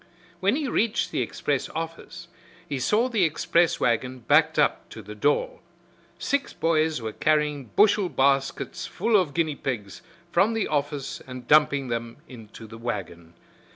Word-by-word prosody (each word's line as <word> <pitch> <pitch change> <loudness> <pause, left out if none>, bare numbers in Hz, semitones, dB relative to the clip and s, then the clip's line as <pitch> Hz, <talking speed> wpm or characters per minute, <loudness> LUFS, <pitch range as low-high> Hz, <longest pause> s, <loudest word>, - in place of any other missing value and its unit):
When 200 +5 +2
he 295 -1 -2
reached 225 -2 0
the - - -1
express - - -2
office 165 +1 -6 0.4
he 140 -5 -3
saw 215 - +2
the 225 -7 +1
express 170 +1 +2
wagon 125 +2 0
backed 155 +6 +3
up - - +1
to - - -10
the - - -9
door. - - 0 0.6
Six 280 0 -1
boys 160 -2 +1
were 110 -1 -4
carrying 150 -3 +1
bushel 205 -2 +4
baskets 135 -1 0
full 220 +4 0
of 180 -8 +2
guinea 160 -3 +1
pigs 110 -9 -5 0.3
from 195 +7 +3
the 225 - 0
office 145 -2 -3
and 125 -1 -9
dumping 145 -3 +4
them 115 0 -4
into 115 -2 -12
the 115 +1 -11
wagon. 85 -8 -6
150 Hz, 155 wpm, -25 LUFS, 125-190 Hz, 0.6 s, bushel